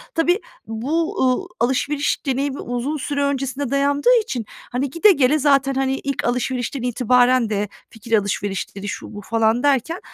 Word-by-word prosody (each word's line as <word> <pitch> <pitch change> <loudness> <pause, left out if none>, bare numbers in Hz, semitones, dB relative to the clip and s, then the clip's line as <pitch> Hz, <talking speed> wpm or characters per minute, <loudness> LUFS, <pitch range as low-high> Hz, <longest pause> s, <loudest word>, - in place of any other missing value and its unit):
Tabii 345 +4 +2 0.3
bu, 280 +10 -1
uuu, 255 -1 +1
alışveriş 275 +5 0
deneyimi 275 +1 -1
uzun 245 +5 -3
süre 285 0 -2
öncesinde 275 -1 -2
dayandığı 285 - +3
için, 245 - -4 0.3
hani, 260 +3 -1
gide 335 +9 +5
gele 290 -2 +3
zaten, 275 -1 +3
hani, 265 0 0
ilk 275 -1 -2
alışverişten 250 +1 -1
itibaren 250 0 +3
de 205 -1 -1 0.2
fikir 225 0 -1
alışverişleri 200 0 -3
şu - - -6
bu 205 - -7
falan 225 +3 +1
derken, 290 +5 +1
265 Hz, 150 wpm, -21 LUFS, 240-285 Hz, 0.3 s, gide